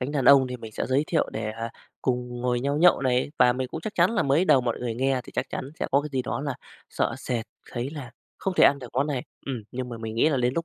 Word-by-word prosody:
cánh 130 +3 -3
đàn 140 -3 0
ông 135 -2 +7
thì 125 0 -5
mình 110 -2 -10
sẽ - - -3
giới 135 +3 +2
thiệu 165 - +1
để, 110 0 -3
ờ, 115 +1 -5 0.3
cùng 125 -1 -2
ngồi 125 0 0
nhau 140 +2 0
nhậu 175 -2 +6
này. 130 +1 +1
Và 125 - +6
mình 130 0 -3
cũng 160 - -6
chắc 215 +5 -5
chắn 175 +4 +4
là 230 - +1
mới 140 +5 +3
đầu 135 -8 +5
mọi 120 -2 -2
người 120 -2 -3
nghe 130 +1 +1
thì - - -12
chắc 130 - -1
chắn - - -3
sẽ - - -1
có 140 - +4
cái 150 - -6
gì 130 -1 0
đó 125 - -3
là 140 -2 -2 0.4
sợ - - 0
sệt 120 -4 -2 0.3
thấy 125 +2 -3
là 145 -5 -7 0.3
không 190 - -2
thể - - +6
ăn 140 - +5
được 125 -3 -9
món 135 +3 +1
này. 140 -5 -2 0.2
Ừm, 130 -5 -3
nhưng 125 0 -4
mà 120 - -6
mình 110 -1 -5
nghĩ 120 - +4
là 145 - +1
đến 125 0 +1
lúc 165 - -1
130 Hz, 300 wpm, -26 LUFS, 125-140 Hz, 0.4 s, ông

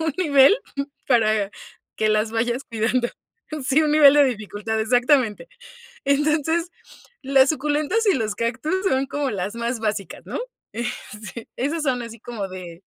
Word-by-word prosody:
un 320 -2 0
nivel 290 - +6 0.5
para 215 -5 +2 0.5
que 215 - +1
las 215 +1 +1
vayas 240 +3 -1
cuidando. 235 +2 0 0.6
Sí, 270 +4 +3
un 300 -1 +1
nivel 290 -2 +7
de 290 -1 +6
dificultad, 220 -2 -2
exactamente. 245 - +2 0.6
Entonces, 305 +4 +1 0.5
las 270 0 +4
suculentas 300 - 0
y 400 - +5
los 220 -5 -1
cactus 235 - -2 0.2
son 265 -3 +1
como 285 -1 -2
las 200 +1 -3
más 235 0 -3
básicas, 210 -4 -3
¿no? - - -5 0.3
Eh, 235 +2 -3 0.5
sí, 230 - -8
esas 300 +6 -1
son 260 -4 0
así 230 -1 -8
como 215 -5 -5
de 180 -2 -9
245 Hz, 150 wpm, -23 LUFS, 220-290 Hz, 0.6 s, nivel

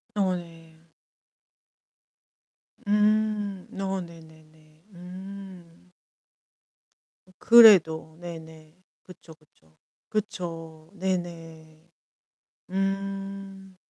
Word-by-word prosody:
어 190 -3 +1
네. 165 -2 -11 2.1
음. 210 -2 +1
어 195 -1 -2
네네네. 160 -2 -16
음. 185 -1 -11 1.5
그래도. 170 -9 +7
네네. 160 -2 -11 0.3
그쵸 175 -2 -14
그쵸. 80 - -31 0.3
그쵸. 165 -6 -5
네네. 165 -4 -5 0.8
음. 195 0 -4
180 Hz, 95 characters per minute, -26 LUFS, 160-195 Hz, 2.1 s, 그래도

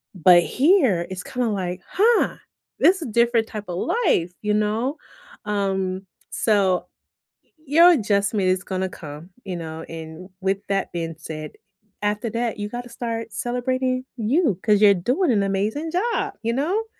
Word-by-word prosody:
but 175 0 +6
here 260 - +3
it's 185 -1 -5
kinda, 250 -2 -2
like, 180 -3 -3
"Huh, 455 +4 +2 0.4
this 370 0 +4
is - - -5
different 235 0 +2
type 215 -2 -7
of 175 - -3
life, 195 - +1
you 210 0 0
know." 220 +7 0 0.5
Um, 195 -2 -1 0.3
so, 195 -4 +1 0.8
your 335 +5 +7
adjustment 205 - +1
is 185 0 +1
gonna 190 0 -2
come, 155 +2 -10
you 185 -3 -4
know, 160 -1 -6
and 165 +3 -9
with 195 +1 0
that 195 -1 -1
being 165 -2 -4
said, 155 -1 -7 0.5
after 210 +2 -1
that, 230 +1 -2
you 205 0 -3
gotta 245 +2 -6
start 230 -2 -4
celebrating 255 +4 -1
you 240 - +1
'cause 210 -2 +3
you're 200 -1 +7
doing 250 - +1
an 200 -2 +2
amazing 210 +11 -1
job, 465 +7 -1
you 230 +1 0
know? 360 - 0
210 Hz, 150 wpm, -23 LUFS, 185-250 Hz, 0.8 s, your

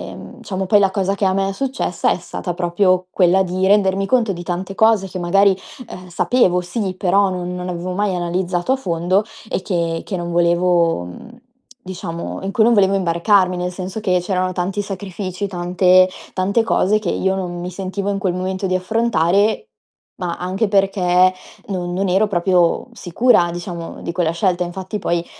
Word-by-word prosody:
mhmm, 250 - -12
diciamo 190 -4 -4
poi 205 +2 +5
la 195 -1 +3
cosa 195 0 0
che 200 - -1
a 190 - +2
me 195 0 0
è 195 - -4
successa 270 +4 -1
è - - 0
stata 175 - -5
proprio 180 +1 +1
quella 185 +1 +3
di 185 +1 -1
rendermi 195 -1 +3
conto 235 -3 +2
di 175 -1 -7
tante 180 +2 -4
cose 220 -3 +3
che 185 - -6
magari, 195 +2 +3 0.3
ehm, 180 0 -9
sapevo 180 -1 +2
sì, 185 +1 -3
però 195 +2 +2
non 180 -1 -4
non 180 0 -5
avevo 180 +1 -4
mai 200 -1 0
analizzato 175 +3 -1
a - - 0
fondo 180 -3 0 0.3
e - - -2
che 170 -3 -2
che 195 - -4
non 175 0 -4
volevo 170 - +2
mhmm, 90 - -10 0.5
diciamo, 170 -2 -6
in 195 - -3
cui 220 - +3
non 235 +2 +4
volevo 195 -1 +4
imbarcarmi, 185 +1 +2
nel 180 0 -2
senso 185 +3 -6
che 185 -4 +2
c'erano 185 0 -1
tanti 190 +3 -2
sacrifici, 195 0 -5
tante 180 0 +3 0.3
tante 195 +5 +1
cose 215 -1 +2
che 205 -5 -3
io 190 0 0
non 175 -2 -4
mi 180 +1 -5
sentivo 195 +2 -4
in 200 - -2
quel 190 -2 -1
momento 185 +1 -2
di 185 - 0
affrontare, 210 - +1 0.5
ma 175 -2 -4
anche 185 +5 -1
perché 185 -2 +3 0.4
non 180 -2 -3
non 195 +2 -1
ero 195 +4 +3
proprio 175 -2 +2
sicura, 175 0 +2
diciamo, 175 -1 -7
di - - -3
quella 170 -1 0
scelta. 180 +1 0
Infatti 190 +4 -5
poi, 170 -3 -1
185 Hz, 185 wpm, -19 LUFS, 175-195 Hz, 0.5 s, poi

